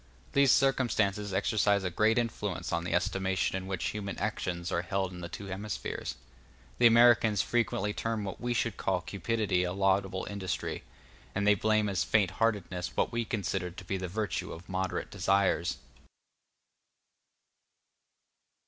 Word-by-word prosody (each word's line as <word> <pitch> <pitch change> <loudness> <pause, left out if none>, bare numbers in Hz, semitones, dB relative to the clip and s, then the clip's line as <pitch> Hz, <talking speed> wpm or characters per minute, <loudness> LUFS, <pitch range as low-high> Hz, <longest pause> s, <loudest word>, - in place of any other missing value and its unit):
These 140 -2 +5
circumstances 110 -7 +2
exercise 100 +1 +2
a 90 - -1
great 110 +6 +3
influence 105 -7 -2
on 85 0 -1
the 90 - -2
estimation 95 +1 0
in 95 0 -4
which 95 -3 -2
human 100 -2 -5
actions 90 -4 -2
are 85 - +1
held 95 +1 -2
in 90 -1 -8
the 85 - -6
two 100 - -7
hemispheres. 100 +2 -4 0.6
The 120 - +8
Americans 115 -3 +5
frequently 105 -4 0
term 115 -1 -2
what 95 -2 -6
we 120 0 -1
should 120 -3 0
call 95 -2 0
cupidity 100 0 0
a 90 0 -1
laudable 95 0 +1
industry; 100 -2 -3 0.5
and 100 +1 0
they 105 - +6
blame 110 +1 +2
as 95 -4 0
faint 100 -4 +2
heartedness 95 -5 -1
what - - +1
we 120 0 -1
consider 95 -4 -2
to 90 +2 -11
be 95 +2 -2
the 95 0 -4
virtue 105 +3 -3
of 85 +2 -10
moderate 95 0 -2
desires. 95 -3 +1
100 Hz, 150 wpm, -30 LUFS, 95-110 Hz, 0.6 s, The